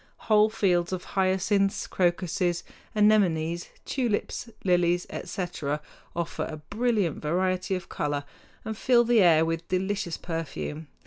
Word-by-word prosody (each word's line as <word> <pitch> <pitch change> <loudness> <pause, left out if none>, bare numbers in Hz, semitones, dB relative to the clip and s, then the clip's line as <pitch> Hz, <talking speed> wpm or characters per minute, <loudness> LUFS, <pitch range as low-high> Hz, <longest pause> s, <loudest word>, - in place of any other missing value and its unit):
Whole 215 0 +6
fields 180 -5 +1
of 180 - -3
hyacinths, 195 +1 +2
crocuses, 175 0 0 0.3
anemones, 175 -6 +3 0.2
tulips, 240 -2 -1
lilies, 175 -1 +2
etc., 155 -5 -3 0.4
offer 170 -1 -2
a 155 - -6
brilliant 205 +1 -1
variety 185 +4 0
of 185 - -6
color 145 -1 -2 0.4
and 220 0 -3
fill 240 +2 +4
the 235 -2 +4
air 165 -3 +6
with 165 0 -3
delicious 185 -2 -1
perfume. 160 -2 -5
180 Hz, 120 wpm, -27 LUFS, 165-205 Hz, 0.4 s, Whole